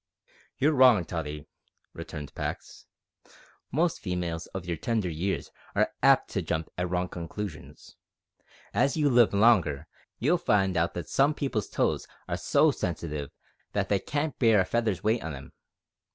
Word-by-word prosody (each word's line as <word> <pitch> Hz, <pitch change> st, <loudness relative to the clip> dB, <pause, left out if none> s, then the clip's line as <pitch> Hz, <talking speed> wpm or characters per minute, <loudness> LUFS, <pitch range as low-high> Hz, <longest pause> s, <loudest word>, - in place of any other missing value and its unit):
"You're 150 Hz, +3 st, +3 dB
wrong, 125 Hz, -, +6 dB
Tottie," 75 Hz, -4 st, -5 dB, 0.5 s
returned 75 Hz, -2 st, -8 dB
Pax; -, -, -6 dB, 0.8 s
"most 165 Hz, +5 st, +1 dB
females 90 Hz, -3 st, -3 dB
of 95 Hz, -3 st, -7 dB
your 85 Hz, -1 st, -2 dB
tender 110 Hz, -2 st, -1 dB
years 90 Hz, +5 st, -2 dB, 0.2 s
are -, -, +2 dB
apt -, -, +4 dB
to -, -, -1 dB
jump 80 Hz, 0 st, -2 dB
at 90 Hz, 0 st, -2 dB
wrong 90 Hz, 0 st, 0 dB
conclusions. 85 Hz, +1 st, -8 dB, 0.8 s
As 135 Hz, +8 st, +2 dB
you 145 Hz, -2 st, +3 dB
live 120 Hz, -2 st, +5 dB
longer 100 Hz, -9 st, +3 dB, 0.3 s
you'll 165 Hz, +8 st, +2 dB
find 95 Hz, -, +2 dB
out 85 Hz, +1 st, 0 dB
that 90 Hz, -, -5 dB
some 145 Hz, +2 st, +2 dB
people's 130 Hz, -8 st, -2 dB
toes -, -, 0 dB, 0.2 s
are -, -, -1 dB
so -, -, +3 dB
sensitive 75 Hz, -3 st, -4 dB, 0.4 s
that -, -, -1 dB
they 100 Hz, -, +2 dB
can't 145 Hz, +7 st, -3 dB
bear 115 Hz, -5 st, +5 dB
a -, -, 0 dB
feather's 110 Hz, -4 st, -1 dB
weight 110 Hz, +2 st, +1 dB
on 80 Hz, -3 st, -4 dB
'em. 70 Hz, -, -11 dB
95 Hz, 150 wpm, -28 LUFS, 85-120 Hz, 0.8 s, wrong